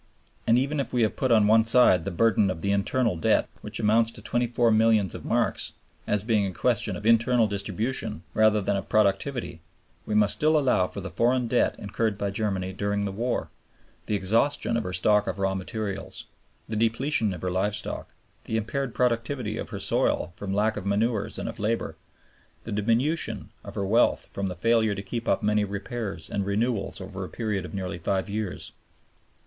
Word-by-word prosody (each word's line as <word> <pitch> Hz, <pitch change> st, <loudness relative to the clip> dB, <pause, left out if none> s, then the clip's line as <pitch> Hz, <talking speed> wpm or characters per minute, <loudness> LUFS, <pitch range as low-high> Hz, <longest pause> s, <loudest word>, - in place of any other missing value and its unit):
And 115 Hz, -, +5 dB
even 140 Hz, +3 st, 0 dB
if 135 Hz, -, -2 dB
we 120 Hz, -3 st, +3 dB
put 130 Hz, +2 st, -2 dB
on 110 Hz, -2 st, +5 dB
one 110 Hz, +2 st, +5 dB
side 115 Hz, -7 st, +5 dB
the -, -, -1 dB
burden 100 Hz, +2 st, +3 dB
of 90 Hz, -3 st, -4 dB
the 100 Hz, -, +1 dB
internal 105 Hz, +2 st, +1 dB
debt, 80 Hz, -, +2 dB
which -, -, -4 dB
amounts 110 Hz, +1 st, +3 dB
to -, -, -11 dB
24 120 Hz, -1 st, +1 dB
milliards 110 Hz, -4 st, +3 dB
of -, -, -7 dB
marks, -, -, 0 dB, 0.3 s
as 105 Hz, -1 st, +1 dB
being 110 Hz, -2 st, +2 dB
a -, -, -4 dB
question 115 Hz, -2 st, 0 dB
of 95 Hz, -, -8 dB
internal 115 Hz, +1 st, +4 dB
distribution 105 Hz, +3 st, -2 dB
rather 110 Hz, -1 st, +4 dB
than 100 Hz, +1 st, 0 dB
of 95 Hz, -, -4 dB
productivity, 100 Hz, -2 st, 0 dB, 0.5 s
we 105 Hz, -, -1 dB
must 105 Hz, -1 st, +4 dB
still 155 Hz, +1 st, +3 dB
allow 125 Hz, -10 st, +2 dB
for 100 Hz, -, -6 dB
the 95 Hz, -1 st, -6 dB
foreign 120 Hz, +7 st, +2 dB
debt 120 Hz, +1 st, +2 dB
incurred 105 Hz, +1 st, -2 dB
by 100 Hz, -1 st, -2 dB
Germany 95 Hz, -3 st, -2 dB
during 100 Hz, +1 st, -1 dB
the 100 Hz, -, -2 dB
war, 120 Hz, +5 st, -2 dB, 0.6 s
the 105 Hz, -, 0 dB
exhaustion 115 Hz, +6 st, +1 dB
of 115 Hz, -, 0 dB
her 90 Hz, -, -3 dB
stock 105 Hz, +3 st, +2 dB
of -, -, -2 dB
raw 95 Hz, -1 st, 0 dB
materials, 100 Hz, +1 st, -4 dB, 0.4 s
the 110 Hz, -, -4 dB
depletion 115 Hz, +1 st, +1 dB
of 90 Hz, -1 st, -7 dB
her 90 Hz, -, -1 dB
live 100 Hz, +3 st, 0 dB
stock, 105 Hz, -, -4 dB, 0.4 s
the 110 Hz, -, -1 dB
impaired 125 Hz, +3 st, -3 dB
productivity 120 Hz, -2 st, -1 dB
of -, -, -5 dB
her -, -, -5 dB
soil 85 Hz, -, 0 dB
from 100 Hz, -3 st, -5 dB
lack 105 Hz, +2 st, +1 dB
of 100 Hz, -, -5 dB
manures 105 Hz, +1 st, 0 dB
and -, -, -4 dB
of -, -, -6 dB
labor, 110 Hz, +3 st, -1 dB, 0.7 s
and 110 Hz, -, -4 dB
the 105 Hz, -, 0 dB
diminution 125 Hz, +10 st, 0 dB
in -, -, -9 dB
her 100 Hz, -, -2 dB
wealth 115 Hz, +5 st, +2 dB
from 100 Hz, 0 st, -2 dB
the 90 Hz, -, -4 dB
failure 110 Hz, +2 st, +2 dB
to 100 Hz, -, -5 dB
keep 115 Hz, +4 st, -5 dB
up -, -, +1 dB
many 105 Hz, 0 st, +2 dB
repairs 100 Hz, -2 st, -5 dB
and 100 Hz, -1 st, -2 dB
renewals 105 Hz, -1 st, -1 dB
over 95 Hz, 0 st, -6 dB
a 90 Hz, -, -6 dB
period 105 Hz, +2 st, -2 dB
of -, -, -8 dB
nearly 95 Hz, -2 st, -4 dB
five 95 Hz, +4 st, -1 dB
years. 105 Hz, -3 st, -4 dB
105 Hz, 195 wpm, -26 LUFS, 100-115 Hz, 0.7 s, And